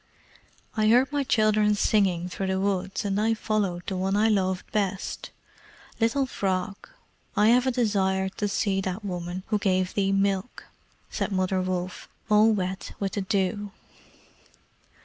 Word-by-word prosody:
"I 215 -1 +2
heard 250 +5 +4
my 290 -1 0
children 215 -3 +3
singing 190 -5 +2
through 190 +1 -4
the 190 0 0
woods, 195 0 -1
and 200 +1 0
I 225 +1 +2
followed 200 -5 -1
the 190 - -3
one 190 +2 0
I 220 +2 +3
loved 190 -3 0
best. 195 -2 -2 0.7
Little 240 +4 +2
Frog, 195 -4 -3 0.5
I 210 +1 +5
have 250 +2 +4
a - - +3
desire 195 -6 +1
to 205 +2 -3
see 195 -1 0
that 190 +2 -4
woman 180 -1 -4
who 210 -1 +1
gave 185 -2 +1
thee 195 -1 +1
milk," 195 +2 0 0.5
said - - -2
Mother 185 0 0
Wolf, 185 0 -4 0.2
all 215 +1 +6
wet 190 -2 -3
with 195 -1 -1
the 205 - -2
dew. 200 +1 -1
195 Hz, 150 wpm, -26 LUFS, 185-215 Hz, 0.7 s, all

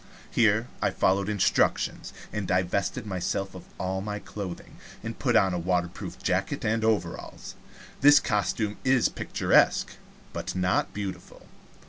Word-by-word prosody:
Here 110 0 +3
I - - +3
followed 100 +2 +1
instructions, 105 -3 +1 0.2
and 105 -3 -3
divested 90 +6 0
myself 95 0 -2
of 95 - -10
all 95 +1 -2
my 105 +1 -4
clothing, 100 -4 -7 0.3
and - - -6
put - - +1
on 95 -1 +4
a 90 - -1
waterproof 90 0 -2
jacket - - -1
and 110 +1 +1
overalls. 105 -7 -2 0.5
This 145 +1 +8
costume 105 0 -1
is 130 -2 +3
picturesque, - - +2 0.4
but - - -4
not 90 0 +1
beautiful. 100 -2 -7
100 Hz, 130 wpm, -27 LUFS, 90-105 Hz, 0.5 s, This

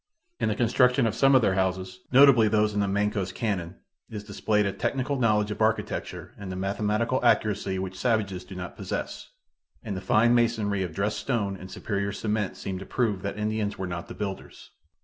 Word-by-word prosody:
In - - +1
the 105 - 0
construction 125 +2 +3
of 115 - +1
some 135 0 +4
of 130 - +5
their 95 - +3
houses, 95 0 -1
notably 130 -4 +7
those 105 0 +2
in 105 - -1
the 100 - +1
Mancos 100 -1 0
Canon, 95 -5 -3 0.3
is 105 -2 -6
displayed 105 0 0
a 100 - -1
technical 135 +1 -1
knowledge 105 -3 +2
of 105 - -5
architecture 110 +1 -1
and 100 -2 -6
a - - -4
mathematical 105 +6 -1
accuracy 100 -5 +2
which 95 0 -5
savages 105 -6 0
do 95 - -11
not 90 -1 -6
possess; - - -5 0.5
and 105 -3 -4
the 95 - -4
fine 115 +4 +3
masonry 110 -4 +1
of 85 -4 -4
dressed 105 +1 -1
stone 105 -7 -1
and 95 0 -10
superior 100 0 -3
cement 105 -1 -2
seem 95 -1 -5
to 95 - -8
prove 110 -7 0
that 100 +1 -4
Indians 105 -1 -2
were 95 - -3
not 85 -2 -5
the - - -9
builders. 100 -2 -7
105 Hz, 195 wpm, -26 LUFS, 95-110 Hz, 0.5 s, notably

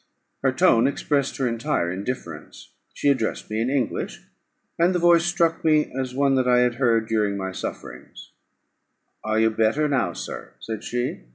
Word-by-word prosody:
Her - - +2
tone 115 +3 +4
expressed 140 0 -1
her 130 - 0
entire 115 - -1
indifference; 95 -5 -7 0.2
she 145 - 0
addressed 120 -5 -1
me 110 +1 -1
in 120 - 0
English, 135 -2 -2 0.6
and 175 +2 +3
the - - +4
voice 170 -1 +4
struck 170 -2 +1
me 155 -1 +3
as 130 -1 -4
one 140 0 +2
that 130 -1 +1
I 125 0 +4
had 120 -1 +1
heard 115 -3 +2
during 105 -3 0
my 95 -1 -4
sufferings: - - -8 0.9
"Are 110 0 0
you 110 0 +3
better 115 +8 +1
now, 125 -12 0
sir?" - - -7
said 110 - -6
she. 120 - -3
125 Hz, 170 wpm, -23 LUFS, 110-140 Hz, 0.9 s, tone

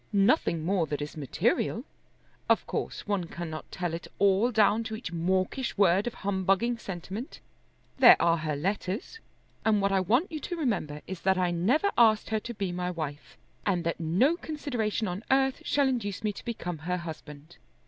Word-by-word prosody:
"Nothing 195 - +3
more 180 -3 +1
that 145 0 -3
is 145 0 -5
material. 215 - 0 0.7
Of - - +3
course - - -4
one 200 -4 -1
cannot 165 -2 -7
tell 175 -3 -3
it 165 - -5
all 200 +4 +4
down 215 0 +3
to 220 -1 -4
each 220 - -6
mawkish 185 +9 -1
word 195 +2 +4
of 240 - -4
humbugging 200 +5 +1
sentiment. 195 - -6 0.6
There - - +9
are 170 0 +3
her 155 -2 -2
letters, 195 - -3 0.4
and 215 -2 +3
what 200 0 +1
I 195 - +3
want 245 - +1
you 310 - -4
to 350 - -4
remember 190 - -2
is 190 -2 -7
that 190 0 +2
I 180 -1 +1
never 245 - +2
asked 220 -2 +4
her 220 - +2
to 240 +3 -7
be 195 -3 -2
my 180 0 -2
wife, 155 -4 -6 0.3
and 180 -4 0
that 170 0 -2
no 190 - +2
consideration 245 - -2
on 180 +4 -4
earth 265 0 +2
shall 285 -1 +2
induce 220 -7 -2
me 210 -1 0
to - - -10
become 180 -8 -4
her 180 +4 -2
husband. 160 -2 -9
195 Hz, 180 wpm, -28 LUFS, 170-230 Hz, 0.7 s, There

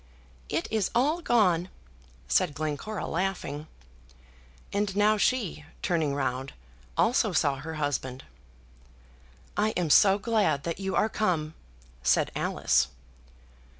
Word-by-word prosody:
"It - - -1
is 220 -4 +1
all 295 +8 +2
gone," 185 - +2 0.6
said 145 - +2
Glencora, 155 +8 -3
laughing. 165 -4 -3 1.1
And 200 -1 0
now 210 +1 +4
she, 205 -9 0 0.2
turning 160 -5 +1
round, 130 -1 -2 0.4
also 225 -4 +3
saw 145 -4 +2
her 160 +3 -6
husband. 135 -3 -2 1.3
"I 215 +1 +1
am 170 -4 0
so 195 +3 +6
glad 205 -10 +1
that 170 +2 -3
you 190 -1 -2
are 215 - +3
come," 170 -8 -1 0.5
said 60 -1 +2
Alice. - - +2
175 Hz, 115 wpm, -28 LUFS, 145-210 Hz, 1.3 s, so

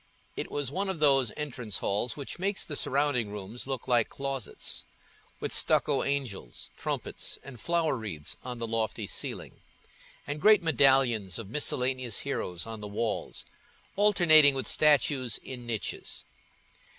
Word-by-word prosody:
It - - -4
was 145 -3 -2
one 195 +5 -2
of 190 -4 -3
those 135 -6 +4
entrance 125 -8 -4
halls 110 +6 0
which 140 +4 -6
make 195 +2 -1
the 150 - -4
surrounding 135 -6 +1
rooms 105 +5 -6
look 135 -3 -4
like 120 -3 +3
closets—with 135 -4 -6
stucco 140 -2 +3
angels, 130 - -3
trumpets, - - -3
and 130 -3 -10
flower 170 -1 +1
wreaths 105 -11 -5
on 125 -1 -5
the 115 - -3
lofty 115 -1 -2
ceiling, - - -5 0.6
and 145 +1 -4
great 210 -1 +6
medallions 130 - +3
of 110 -3 -7
miscellaneous 130 -4 0
heroes 90 -11 -3
on 110 -1 -7
the 105 - -5
walls, 105 +2 -3 0.5
alternating 170 -8 +6
with 135 - -1
statues 140 -5 +3
in 125 -2 -8
niches. 115 -3 -4
130 Hz, 140 wpm, -29 LUFS, 115-145 Hz, 0.6 s, great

